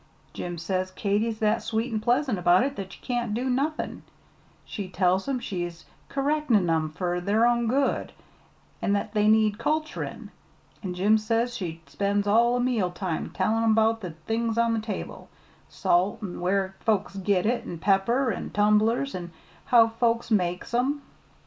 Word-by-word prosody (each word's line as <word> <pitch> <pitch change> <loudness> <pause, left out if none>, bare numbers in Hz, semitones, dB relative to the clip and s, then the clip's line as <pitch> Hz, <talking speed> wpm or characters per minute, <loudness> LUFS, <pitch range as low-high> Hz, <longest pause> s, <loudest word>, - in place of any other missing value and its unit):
"Jim 175 -1 -5
says 185 +2 -2
Katy's 210 +4 -1
that 215 +1 +1
sweet 225 +2 -2
an' 215 - 0
pleasant 245 -1 +1
about 175 +4 +4
it 275 +1 -2
that 190 -1 -7
ye - - -19
can't 240 -3 -1
do 250 +3 -1
nothin'. 275 +5 -1 0.6
She 200 -4 -6
tells 185 +2 +1
'em 270 -2 0
she's 175 -6 -5 0.2
kerrectin' 275 -8 +1
'em 160 -1 +1
fur 175 +3 -2
their 205 +6 +2
own 240 -1 +2
good, 270 +4 0 0.7
an' 200 - +1
that 205 +1 -2
they 210 -1 +2
need 215 -1 +3
culturin'. 310 +5 -3 0.5
An' 185 -3 -4
Jim 210 +4 +3
says 230 +3 0
she 165 -5 -5
spends 200 +8 -1
all 235 +4 +4
o' - - 0
meal 240 -7 +1
time 175 -2 -3
tellin' 220 +3 +1
'bout 225 0 +2
the 180 - -5 0.2
things 225 0 -1
on 235 0 +3
the 225 - 0
table, 215 -2 -6 0.4
salt, 190 +6 +1
an' 185 -4 -5
where 190 +1 0
folks 205 -2 0
git 195 -1 +1
it, 240 +2 0
an' 170 - -5
pepper, 205 +8 +2
an' - - -5
tumblers, 210 +6 +2
an' 175 -1 -5 0.4
how 235 -4 +6
folks 230 +1 0
make 180 -1 0
'em. 275 +4 0
215 Hz, 170 wpm, -26 LUFS, 185-235 Hz, 0.7 s, how